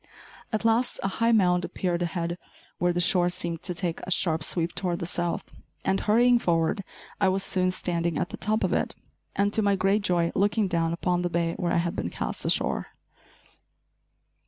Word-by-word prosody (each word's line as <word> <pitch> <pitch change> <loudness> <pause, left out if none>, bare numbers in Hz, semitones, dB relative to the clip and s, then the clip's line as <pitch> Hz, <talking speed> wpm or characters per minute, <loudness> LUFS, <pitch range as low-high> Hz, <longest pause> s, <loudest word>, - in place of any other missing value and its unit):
At 215 0 -2
last 230 +2 +2
a - - +1
high 230 +4 +1
mound 180 -5 +3
appeared 175 0 -2
ahead 170 0 -2 0.4
where 175 +1 +2
the 175 - -1
shore 175 0 +4
seemed 175 -2 -3
to 180 - -3
take 170 -2 -3
a - - -7
sharp 165 -3 +2
sweep 170 +1 0
toward 180 -2 -2
the 170 - -4
south, 175 0 -2 0.3
and, 190 0 +2
hurrying 240 +3 +4
forward, 165 0 +1 0.4
I 195 -2 +4
was 190 +1 0
soon 185 -1 +1
standing 170 -3 -1
at - - -1
the - - -6
top 215 +1 0
of - - +1
it - - -1 0.4
and, 200 +1 +1
to 220 - +3
my 200 -1 +3
great 195 +2 +2
joy, 175 -3 +1
looking 205 +1 +2
down 165 -2 0
upon 175 +1 0
the 175 - -1
bay 170 -1 0
where 175 -1 -1
I - - +2
had 170 0 -1
been 85 - -2
cast - - -3
ashore. - - 0
180 Hz, 195 wpm, -26 LUFS, 170-195 Hz, 0.4 s, shore